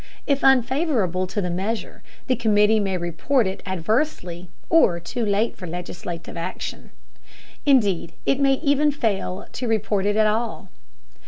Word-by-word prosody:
If 280 -1 +1
unfavorable 255 - +2
to 205 +3 -2
the 180 -2 -2
measure, 200 +6 -3 0.2
the 255 - +1
committee 215 -1 +3
may 195 -2 0
report 180 - 0
it 190 +1 -3
adversely, 185 - -1 0.2
or 200 - +4
too 230 +8 -4
late 210 +2 +1
for 180 - -8
legislative 175 0 -6
action. 170 - -5 0.8
Indeed, 205 - +3
it 275 - +2
may 275 -1 +4
even 290 0 +3
fail 210 -9 -2
to 250 - -3
report 210 -3 0
it 205 - +1
at 215 0 +4
all. 215 -2 -1
210 Hz, 145 wpm, -23 LUFS, 180-250 Hz, 0.8 s, or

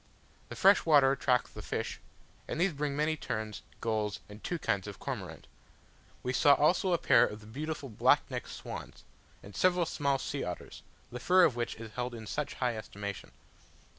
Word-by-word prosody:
The - - -7
fresh 195 +1 +5
water 145 -4 +6
attracts 125 -2 +1
the - - -8
fish, - - -4 0.5
and - - -4
these 180 0 +2
bring 145 0 -2
many 155 +2 +1
terns, 110 -8 -4 0.2
gulls, 105 -6 -1
and 105 +1 -12
two 175 - -2
kinds 100 - -1
of 100 - -7
cormorant. - - -6 0.8
We 125 - -1
saw 140 +2 +6
also 175 +5 +3
a - - +4
pair 120 - +5
of 105 -3 -2
the 105 - -15
beautiful 145 +5 -5
black 110 - +3
necked - - -4
swans, - - -8 0.4
and 100 - -12
several 180 -1 +3
small 140 -4 0
sea - - -3
otters, - - -6 0.3
the 125 - -6
fur 185 +8 +5
of 145 -8 +4
which 120 -1 -2
is 110 -1 -9
held 125 -1 -3
in 110 -1 -8
such 150 +7 -3
high 125 -2 0
estimation. 100 -2 -6
130 Hz, 185 wpm, -31 LUFS, 110-155 Hz, 0.8 s, water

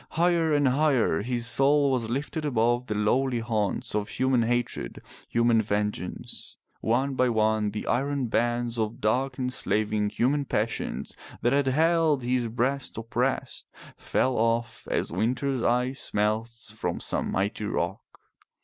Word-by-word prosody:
Higher 170 -1 +3
and 145 -2 +3
higher 130 - +2
his 120 +1 -1
soul 140 +4 +3
was 120 -4 0
lifted 145 +5 -3
above 120 -2 +1
the 105 - -2
lowly 125 +5 +1
haunts 110 -4 -2
of 105 0 -1
human 130 -1 +1
hatred, 120 +1 -2 0.3
human 115 -1 +3
vengeance. 105 -3 -4 0.2
One 130 +5 +1
by 130 -1 +2
one 110 -2 +2
the 105 +1 -5
iron 140 +1 0
bands 120 +1 0
of 110 0 -2
dark 125 +5 0
enslaving 110 -5 0
human 140 +6 +1
passions 105 - -2 0.3
that 120 - +3
had 140 -1 +2
held 160 0 +3
his 125 -1 0
breast 125 +4 -1
oppressed, 120 +4 -2 0.3
fell 130 -1 0
off 115 0 -1
as - - -1
winter's 130 +3 0
ice 125 +3 0
melts 110 +2 -1
from 110 - -3
some - - -1
mighty 100 +2 -1
rock. - - -2
120 Hz, 140 wpm, -27 LUFS, 110-135 Hz, 0.3 s, Higher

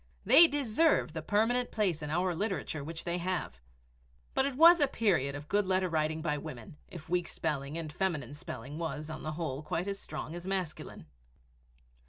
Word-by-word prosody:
They 335 - +8
deserve 290 - +2
the 160 - -4
permanent 225 +8 +1
place 190 -7 0
in 150 - -4
our 175 +3 +1
literature 170 -5 -3
which 160 +2 -6
they 175 +1 -2
have. 175 - -3 0.7
But 265 - +2
it 275 - -4
was 335 +4 +8
a 290 - +4
period 175 - +1
of 145 +1 -8
good 205 +1 +1
letter 185 0 +2
writing 155 0 0
by 150 -3 0
women 140 -3 -9
if 165 -3 -10
weak 175 0 0
spelling 140 +1 -3
and 155 -2 -5
feminine 150 -9 -2
spelling 145 0 -7
was, 160 -2 -4
on 155 - -6
the 155 - -4
whole, 150 -4 -3
quite 165 +4 -3
as 200 0 -3
strong 155 +1 -6
as 175 +1 -7
masculine! 185 - -4
170 Hz, 185 wpm, -31 LUFS, 150-195 Hz, 0.7 s, They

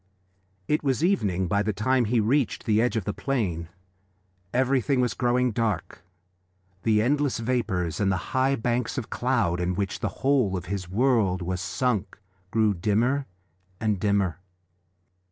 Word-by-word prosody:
It 150 - +1
was 135 +1 0
evening 100 - +1
by 100 +4 +1
the 105 +1 -1
time 125 +5 +1
he 115 +2 +2
reached 120 +3 +1
the 110 0 +3
edge 125 0 +1
of 110 - -1
the 105 - -2
plain: 95 -13 -2 0.8
everything 130 +1 +2
was 125 -1 +1
growing 125 0 +1
dark. 105 -7 -2 0.8
The 110 0 +3
endless 145 +2 +1
vapours 110 -8 -1
and 100 -2 +2
the 95 -2 -4
high 130 +1 +3
banks 120 +1 -1
of 120 - -4
cloud 115 -9 0
in 90 +1 -1
which 100 0 -2
the 110 - -1 0.2
whole 130 -9 +3
of 90 - -5
this 95 -3 -4
world 105 -4 +2
was 90 +1 -3
sunk 110 0 -1 0.3
grew 110 0 +2
dimmer 115 +9 +1 0.5
and 105 -3 0
dimmer. 100 -4 +1
110 Hz, 155 wpm, -26 LUFS, 95-125 Hz, 0.8 s, the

